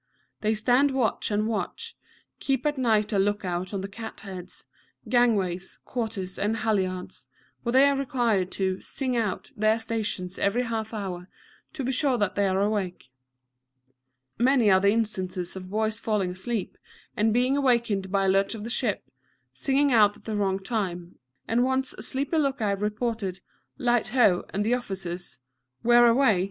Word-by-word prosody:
They 215 +1 +1
stand 245 +6 +3
watch 265 -4 0
and 210 0 0
watch, 230 - -3 0.4
keep 270 -1 -1
at 295 0 +1
night 220 -3 +2
a 200 - +3
look 205 +1 0
out 180 +1 -2
on 200 -2 -3
the 195 - -4
cat 220 +3 -8
heads, 185 -3 -8 0.4
gangways, 205 -7 +1
quarters, 215 -7 -4
and 215 +3 0
halliards, 190 -5 -2 0.3
where 235 - -2
they 265 +2 +7
are 280 - +2
required 240 -8 0
to 190 -1 -1
"sing 260 -2 -3
out" 220 +2 -2
their 215 0 +3
stations 215 -5 -3
every 220 +5 +1
half 225 -2 -3
hour, 190 -4 -5 0.4
to 275 - -4
be 255 - 0
sure 265 -1 +2
that 205 -4 0
they 200 -1 +1
are 190 0 +1
awake. 195 -9 -2 1.3
Many 245 -4 +4
are 190 - +6
the 200 +1 +3
instances 190 -5 0
of 185 -1 -8
boys 215 +1 -1
falling 210 -5 0
asleep, 190 +3 -4 0.4
and 220 +1 +2
being 250 +4 +2
awakened 235 -8 +1
by 195 -1 +2
a - - +2
lurch 195 +3 +2
of 210 - -7
the 230 - -5
ship, 215 - -1 0.5
singing 275 - +2
out 210 -2 +5
at - - -22
the 220 - -3
wrong 195 -2 +1
time, 190 -4 -4 0.3
and 235 +2 +2
once 260 0 0
a - - -10
sleepy 285 +4 -1
look 275 -3 0
out 200 -2 0
reported 210 -3 -2 0.4
"Light, 240 -4 +1
ho!" 215 -7 +3
and 200 +2 -1
to 220 - 0
the - - +4
officer's 185 -7 -5 0.5
"Where 240 0 +6
away?" 235 -5 +4
215 Hz, 170 wpm, -26 LUFS, 190-240 Hz, 1.3 s, they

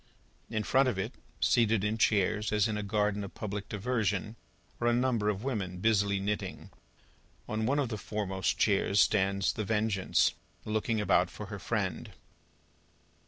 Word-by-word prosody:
In 110 -2 -1
front 130 +3 +3
of 110 - -3
it, 95 - -3 0.3
seated 115 -3 +3
in 105 +1 0
chairs, 105 0 +2
as 105 -1 +3
in 110 - -2
a 105 - -2
garden 105 0 0
of 100 - -9
public 105 -1 -5
diversion, 105 -1 -1 0.4
are 120 - +1
a 120 - +4
number 120 -4 +1
of 105 +1 -2
women, 100 -9 -3
busily 100 0 +2
knitting. 105 +2 -4 0.8
On 110 +1 -1
one 140 +3 +2
of 140 -5 0
the 110 -3 -4
fore 105 +1 -3
most 95 0 -1
chairs, 100 -1 +2
stands 100 +1 +3
The 110 - -3
Vengeance, 105 -2 +1 0.3
looking 110 +1 0
about 105 - +3
for - - -8
her - - -5
friend. - - -2
105 Hz, 165 wpm, -30 LUFS, 100-110 Hz, 0.8 s, a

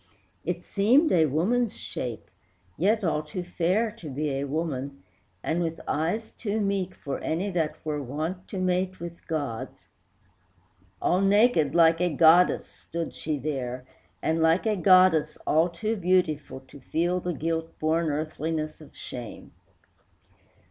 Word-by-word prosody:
It 175 +1 -3
seemed 255 +11 +3
a 160 -3 +4
woman's 205 - +1
shape, 120 -4 -6 0.4
yet 210 +5 +2
all 160 -3 +1
too 155 +4 -6
fair 185 +6 0
To 155 - -7
be 145 +2 -2
a 135 +1 -2
woman, 140 - -3 0.4
and 165 +2 0
with 165 -1 -2
eyes 175 +9 -1
too 215 -1 -3
meek 195 -3 -1
For 140 - -5
any 180 +6 -2
that 165 -4 -1
were 150 -2 -2
wont 155 +8 -4
to 195 - -6
mate 185 0 0
with 170 0 -9
gods. 145 -8 -4 1.1
All 180 +2 +3
naked 195 - +4
like 165 0 +5
a 180 - +3
goddess 165 +4 +5
stood 170 0 -6
she 155 -1 -3
there, 130 -3 -4 0.4
And 160 +1 +1
like 165 +5 +3
a 215 -1 +2
goddess 185 -3 +5
all 160 +3 +3
too 215 +7 -2
beautiful 175 -8 0
To 135 +2 -15
feel 175 +7 0
the 175 0 -3
guilt 165 +2 -3
born 160 +1 +1
earthliness 155 +1 -3
of 150 - -15
shame. 120 -3 -8
165 Hz, 145 wpm, -27 LUFS, 150-185 Hz, 1.1 s, like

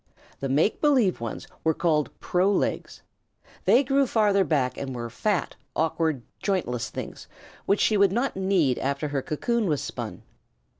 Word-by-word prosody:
The 135 - -3
make 150 +10 +2
believe 255 - +3
ones 115 -2 -5 0.2
were 160 -1 +2
called 155 -4 +1
pro 185 +3 +2
legs. - - -2 0.6
They 260 - +5
grew 275 0 +2
farther 205 -4 +3
back 140 -7 0
and 135 -2 -5
were 120 -1 -5
fat, 200 - -1 0.2
awkward, 160 -4 0 0.2
jointless 170 - -1
things - - -7 0.4
which 200 - +2
she 215 - +3
would 200 -2 +4
not 240 +6 0
need 190 -9 +2
after 140 +2 -2
her 140 -2 -1
cocoon 225 - -1
was 150 -4 0
spun. - - -6
170 Hz, 155 wpm, -26 LUFS, 140-205 Hz, 0.6 s, They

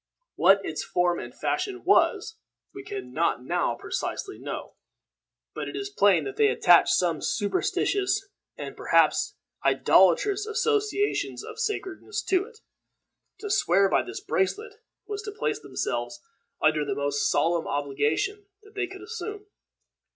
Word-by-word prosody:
What 195 0 +4
its 155 - -3
form 175 -1 +1
and - - -7
fashion 385 -3 -3
was 445 +3 +2 0.3
we 395 - -8
can 400 0 -7
not - - 0
now - - 0
precisely 390 - -4
know; - - -6 0.8
but - - -5
it - - -8
is 405 0 -4
plain 195 - +4
that 135 -1 -6
they 145 - +5
attached 170 +6 +5
some 170 -4 0
superstitious, 385 - 0 0.3
and - - -7
perhaps - - +2 0.3
idolatrous 410 0 +4
associations 430 -3 0
of 445 0 -9
sacredness 420 -2 -3
to 385 0 +1
it. 465 0 -17 0.8
To 415 -2 -4
swear 195 - +3
by - - +3
this 380 +1 -7
bracelet 410 +2 -1 0.3
was 415 -1 -5
to 420 +1 -6
place 420 - -2
themselves 120 0 -3 0.4
under 155 -1 +3
the - - -2
most 145 0 0
solemn 165 +3 +1
obligation 145 - -1 0.2
that 420 0 -18
they 405 -3 -2
could 385 +1 -10
assume. 420 -1 -6
390 Hz, 140 wpm, -26 LUFS, -, 0.8 s, they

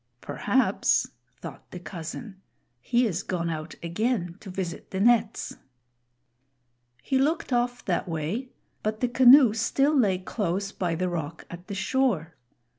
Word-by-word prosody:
"Perhaps," - - +1 0.3
thought - - -9
the 180 - -8
cousin, 190 +4 -8 0.4
"he 240 - +2
is 190 -4 -1
gone 170 -3 -2
out 155 0 -6
again 175 0 -1
to 200 - -10
visit 180 -2 -5
the 190 - -4
nets." 230 0 +2 1.5
He 265 - +1
looked 295 -1 0
off 245 0 0
that 180 -1 -1
way, 165 - -3 0.3
but 215 0 -2
the 250 - +3
canoe 250 -1 +7
still 275 +6 +2
lay 205 -9 +3
close 195 0 -2
by 175 -5 -2
the 185 +2 -1
rock 165 -2 -4
at 175 +1 -10
the 200 - -5
shore. 195 -6 0
195 Hz, 140 wpm, -26 LUFS, 170-240 Hz, 1.5 s, canoe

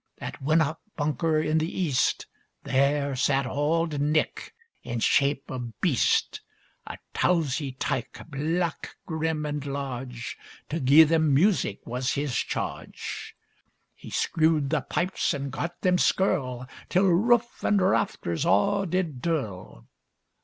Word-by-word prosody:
At - - -7
winnock 155 +2 +2 0.2
bunker 155 +1 +1
in 155 +1 +1
the 160 +4 -3
east, 150 -8 +1 0.4
There 140 +1 +1
sat 135 +1 +1
auld 150 +3 0
Nick, 150 +1 -1 0.3
in 120 -1 -4
shape 140 +4 +2
o' 125 -3 -5
beast; 155 -10 +1 0.5
A - - -6 0.2
towzie 150 -6 +1
tyke, 130 -2 -3
black, 160 +4 -2
grim, 160 -2 -2
and 145 -1 -3
large; 130 -4 -5 0.3
To 160 - -2
gi'e 140 +3 +7
them 160 -1 +2
music 170 - +2
was 125 +2 -2
his 140 -3 -2
charge: - - -4 0.6
He - - -12
screwed 155 -3 +1
the 160 -3 +1
pipes 180 +1 -1
and 140 -1 -4
gart 170 +6 -4
them 180 -1 +3
skirl, 130 -10 +1 0.2
Till 185 +2 +3
roof 235 +7 +2
and 205 - +3
rafters 185 - 0
a' 195 - +2
did 165 -7 -1
dirl! 105 - -3
150 Hz, 125 wpm, -26 LUFS, 135-165 Hz, 0.6 s, gi'e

